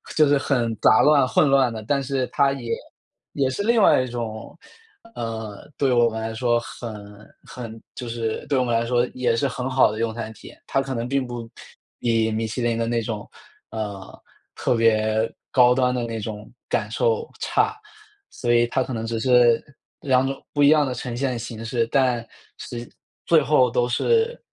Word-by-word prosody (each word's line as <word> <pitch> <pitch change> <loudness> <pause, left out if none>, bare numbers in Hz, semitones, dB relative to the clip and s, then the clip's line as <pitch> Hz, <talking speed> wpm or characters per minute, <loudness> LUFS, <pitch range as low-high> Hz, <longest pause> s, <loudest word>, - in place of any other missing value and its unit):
就 155 -2 +5
是 145 0 +4
很 120 -5 0
杂 - - +6
乱、 145 -3 +5
混 135 +5 +3
乱 130 -4 +3
的。 110 - -6
但 140 +5 0
是 130 -1 -1
它 140 -1 +2
也 120 -4 -6 0.6
也 135 -2 +1
是 165 +10 -3
另 230 0 +3
外 130 - +5
一 - - -5
种， 115 0 -6 0.6
呃， 110 -2 -6
对 135 -2 +2
我 120 -1 +4
们 110 0 -5
来 110 0 -4
说 120 0 +2
很 115 -1 -8 0.5
很 115 -3 -8
就 125 - -6
是 115 -1 -3
对 135 -2 +1
我 - - +2
们 120 - -2
来 115 +1 +1
说 120 0 +2
也 125 -2 +1
是 140 +4 +1
很 125 0 -4
好 130 -4 +4
的 110 - -6
用 115 -1 -1
餐 110 -1 -5
体 - - -14
验。 - - -15
它 135 - +1
可 135 -1 -4
能 115 0 -3
并 135 0 0
不 120 -2 -7 0.5
比 115 -1 +1
米 110 +1 -1
其 120 +3 -4
林 120 -1 0
的 115 0 -1
那 120 0 0
种， 110 -2 -5 0.4
呃， 100 -3 -6 0.3
特 - - 0
别 110 -1 +2 0.2
高 125 -1 +6
端 125 -1 +2
的 120 - -1
那 115 -1 -4
种 105 0 -7 0.2
感 - - -1
受 465 -1 0
差。 430 +1 +1 0.5
所 120 -1 -1
以 120 0 +4
它 130 - 0
可 130 - -6
能 115 0 -3
只 115 0 -2
是 120 -1 +4 0.4
2 130 -2 +2
种 135 - -5
不 145 - +2
一 140 - +7
样 150 -1 +5
的 130 - -2
呈 120 0 -5
现 130 -1 -1
形 115 -1 -7
式。 115 0 0
但， 125 -4 +2 0.3
实 120 0 -7 0.4
最 165 -2 +5
后 130 -2 +3
都 120 0 +1
是 460 - +1
120 Hz, 215 characters per minute, -23 LUFS, 115-135 Hz, 0.6 s, 一